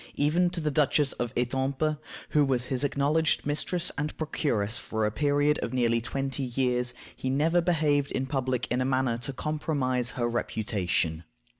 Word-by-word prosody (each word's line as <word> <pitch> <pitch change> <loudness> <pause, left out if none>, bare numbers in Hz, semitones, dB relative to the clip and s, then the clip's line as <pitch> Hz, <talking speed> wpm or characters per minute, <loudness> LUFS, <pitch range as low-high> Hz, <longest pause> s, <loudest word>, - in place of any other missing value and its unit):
Even 165 +5 +3
to 175 0 -4
the 155 -2 0
Duchess 145 -1 +3
of 120 -2 -1
Etampes, 135 +5 0 0.3
who 150 - +4
was 130 -3 +1
his 130 +1 -2
acknowledged 145 +3 +1
mistress 170 +4 0
and 150 +1 -3
procuress 120 -8 0
for 110 -1 -1
a 105 - +1
period 145 +4 +2
of - - -3
nearly 115 -2 +2
twenty 135 +3 -2
years, 125 -1 0 0.2
he 130 - -3
never 160 +6 +3
behaved 150 -5 +2
in 130 - -1
public 130 -2 -1
in 125 +1 +1
a - - +2
manner 130 -3 +1
to 120 +3 -2
compromise 135 -4 -1
her 120 -1 +1
reputation. 100 -8 -1
135 Hz, 165 wpm, -28 LUFS, 125-150 Hz, 0.3 s, who